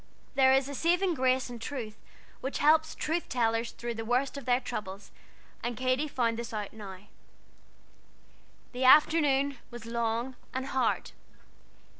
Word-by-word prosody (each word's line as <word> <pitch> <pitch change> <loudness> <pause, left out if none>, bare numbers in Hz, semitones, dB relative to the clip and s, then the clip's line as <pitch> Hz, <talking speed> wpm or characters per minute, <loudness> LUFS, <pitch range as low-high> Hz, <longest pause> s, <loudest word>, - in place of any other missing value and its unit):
There 265 -1 +5
is 265 0 +3
a 285 - -6
saving 350 +6 +2
grace 260 -2 +1
in 240 -1 -8
truth 230 -3 -6 0.4
which 265 - -3
helps 315 +1 +3
truth 330 +3 -2
tellers 230 -1 +1
through 240 0 -5
the 225 0 -5
worst 250 +5 0
of 280 -3 -7
their 245 0 +3
troubles, 205 -6 -6 0.5
and 240 -1 -3
Katy 255 +3 +1
found 235 -5 0
this 235 -1 -6
out 210 -2 -4
now. 195 -4 -9 1.7
The 250 +1 -3
afternoon 280 -1 +5
was 240 -2 -9
long 235 +2 -2 0.2
and 260 0 -2
hard. 265 -1 0
255 Hz, 145 wpm, -29 LUFS, 230-275 Hz, 1.7 s, There